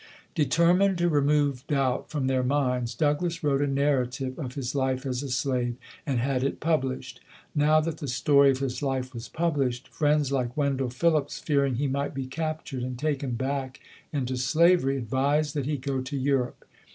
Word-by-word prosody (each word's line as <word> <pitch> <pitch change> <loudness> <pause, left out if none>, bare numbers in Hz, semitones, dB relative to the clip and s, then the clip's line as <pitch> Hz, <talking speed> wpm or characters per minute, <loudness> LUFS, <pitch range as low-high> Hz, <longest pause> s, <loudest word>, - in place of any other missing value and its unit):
Determined 175 +6 +3
to 175 0 +2
remove 145 -3 +2
doubt 135 -3 0
from 145 -4 -2
their 130 -1 +2
minds, 125 -3 0
Douglass 160 +3 0
wrote 140 -2 +2
a 145 - +2
narrative 135 -1 0
of 130 -4 -5
his 135 -2 -3
life 130 -1 0
as 125 -1 -2
a 140 - -5
slave 125 -1 0 0.3
and 135 -3 0
had 130 +1 0
it 135 - -1
published. 150 -5 -1 0.3
Now 150 +1 +4
that 160 0 -3
the 145 - -5
story 140 +3 +4
of 135 - +2
his 135 0 -3
life 130 -2 -2
was 115 -1 -7
published, 140 -7 -1
friends 150 -2 +1
like 125 -2 -1
Wendell 135 -3 0
Phillips, 150 +3 +1
fearing 140 -4 +1
he 140 +5 -1
might 140 +1 -2
be 135 -1 -3
captured 155 -1 -4
and 125 0 -4
taken 140 -2 -1
back 130 +1 -3 0.3
into 130 -3 -2
slavery, 155 +1 +3
advised 140 +5 0
that 145 -3 -2
he 150 -1 0
go 135 0 -2
to 140 +2 -4
Europe. 135 -2 -1
135 Hz, 175 wpm, -27 LUFS, 130-150 Hz, 0.3 s, Now